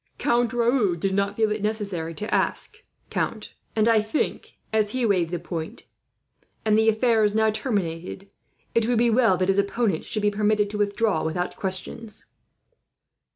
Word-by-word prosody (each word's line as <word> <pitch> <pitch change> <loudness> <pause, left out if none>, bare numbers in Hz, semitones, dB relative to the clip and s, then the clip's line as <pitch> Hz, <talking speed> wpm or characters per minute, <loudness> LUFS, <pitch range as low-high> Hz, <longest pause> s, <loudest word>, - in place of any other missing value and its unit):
"Count 240 -1 +1
Raoul 235 -5 +2
did 190 +3 -1
not 200 +1 0
feel 220 -1 +2
it 210 0 -2
necessary 200 -6 -2
to 210 +4 -4
ask, - - 0 0.3
count; - - -3 0.2
and 215 0 +3
I 225 -2 +5
think, 215 +8 -3 0.2
as 215 -1 +2
he 255 -2 0
waived 185 -6 +2
the 175 - -2
point, 165 -1 -6 0.8
and 215 -1 +4
the 220 +1 +4
affair 225 0 +3
is 210 0 +2
now 220 0 +3
terminated, 195 -4 -3 0.4
it 230 -1 +2
would 245 -1 +2
be 235 0 +3
well 225 -5 +4
that 185 - 0
his 195 +1 +3
opponent 200 -3 0
should 215 - -3
be 205 - +3
permitted 210 0 +1
to 210 - -4
withdraw 205 -3 +1
without 175 +3 -2
questions." 210 +3 -3
210 Hz, 170 wpm, -24 LUFS, 190-225 Hz, 0.8 s, I